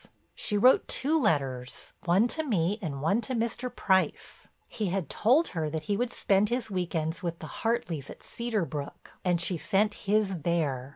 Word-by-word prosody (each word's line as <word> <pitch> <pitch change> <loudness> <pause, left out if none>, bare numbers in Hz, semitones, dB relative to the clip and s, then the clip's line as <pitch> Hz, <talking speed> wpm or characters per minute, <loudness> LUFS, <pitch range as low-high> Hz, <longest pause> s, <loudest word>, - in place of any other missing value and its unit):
"She 210 - 0
wrote 250 +5 +5
two 310 +3 +1
letters, 135 - -1
one 190 +6 +4
to 315 - 0
me 205 - 0
and 140 -6 -4
one 200 +9 +2
to 250 +3 -3
Mr. 235 +2 -2
Price. 190 -6 0 0.2
He 215 - -3
had 185 -4 -2
told 270 +10 +3
her 160 -3 -2
that 155 0 -4
he 205 - 0
would 240 +3 -1
spend 200 +1 +2
his 240 -3 -2
week 180 -3 -2
ends 160 +2 -1
with 170 -2 -3
the 155 - -9
Hartleys 180 - -1
at - - -11
Cedar 230 -6 -2
Brook 145 -3 -7
and 175 -2 +2
she 175 +1 +1
sent 205 +4 +1 0.2
his 205 -4 +2
there. 145 -6 -1
190 Hz, 185 wpm, -28 LUFS, 160-225 Hz, 0.2 s, wrote